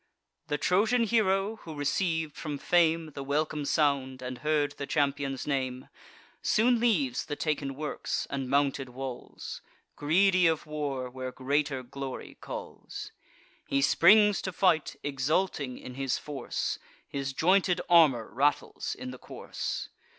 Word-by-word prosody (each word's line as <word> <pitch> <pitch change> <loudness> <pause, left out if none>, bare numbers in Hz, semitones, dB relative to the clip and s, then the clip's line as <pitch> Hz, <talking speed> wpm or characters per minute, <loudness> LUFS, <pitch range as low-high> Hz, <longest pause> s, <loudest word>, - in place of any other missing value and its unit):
The 145 -1 0
Trojan 220 +9 +3
hero, 210 -2 +2
who 160 -7 -9
receiv'd 160 +2 0
from 150 -3 -4
fame 165 +1 +2
The 140 -1 -6
welcome 150 +1 -1
sound, 135 -4 +1
and 125 0 -5
heard 150 -1 +1
the 140 - -3
champion's 140 -2 0
name, 130 -3 -2 0.5
Soon 235 +2 +3
leaves 180 - +1
the 145 - -4
taken 145 -3 -2
works 150 +2 -3
and 135 -2 -3
mounted 140 -1 +1
walls, 130 0 -7 0.3
Greedy 180 +4 +4
of 160 -2 0
war 145 -4 -3
where 130 0 -6
greater 135 0 -1
glory 135 +1 -6
calls. - - -7 0.6
He 140 0 +1
springs 210 +6 +6
to 190 - -3
fight, 170 -5 +2
exulting 140 0 0
in 125 - -9
his 135 0 -1
force 145 -2 -3 0.3
His 135 -1 -3
jointed 180 +5 +3
armour 150 -10 +5
rattles 140 +4 0
in 125 - -6
the 130 - -10
course. - - -5
145 Hz, 135 wpm, -29 LUFS, 135-170 Hz, 0.6 s, springs